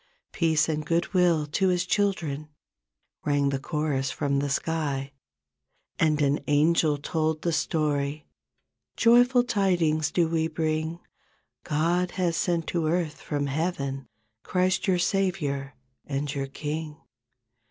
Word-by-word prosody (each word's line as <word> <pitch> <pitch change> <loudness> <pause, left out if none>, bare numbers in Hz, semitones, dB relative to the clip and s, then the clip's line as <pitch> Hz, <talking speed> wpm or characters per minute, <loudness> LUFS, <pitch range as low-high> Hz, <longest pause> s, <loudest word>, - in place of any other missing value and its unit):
Peace 160 -3 +2
and 155 -1 -1
good 170 +4 -1
will 175 -4 +3
to 170 +6 0
His 180 -1 +1
children," 170 -7 -1 0.7
Rang 145 -1 +2
the 135 -1 -1
chorus 145 -2 -1
from 140 -1 -1
the 145 0 -1
sky. 140 -2 -2 0.9
And 155 -2 +3
an 140 +1 +2
angel 150 +1 +3
told 155 +1 -1
the 170 - +1
story, 150 -1 -1 0.7
"Joyful 245 +1 +5
tidings 175 -9 +1
do 170 -2 +2
we 160 0 0
bring 160 +1 -2 0.6
God 170 +4 +1
has 175 -3 +1
sent 170 -2 0
to 165 -3 0
earth 165 -2 -1
from 145 -2 -2
heaven, 140 -3 -2 0.3
Christ, 185 +1 0
your 185 -2 +3
Savior, 175 -8 -1 0.3
and 140 0 -2
your 135 -2 -3
King. 150 +2 -5
155 Hz, 125 wpm, -26 LUFS, 145-175 Hz, 0.9 s, Joyful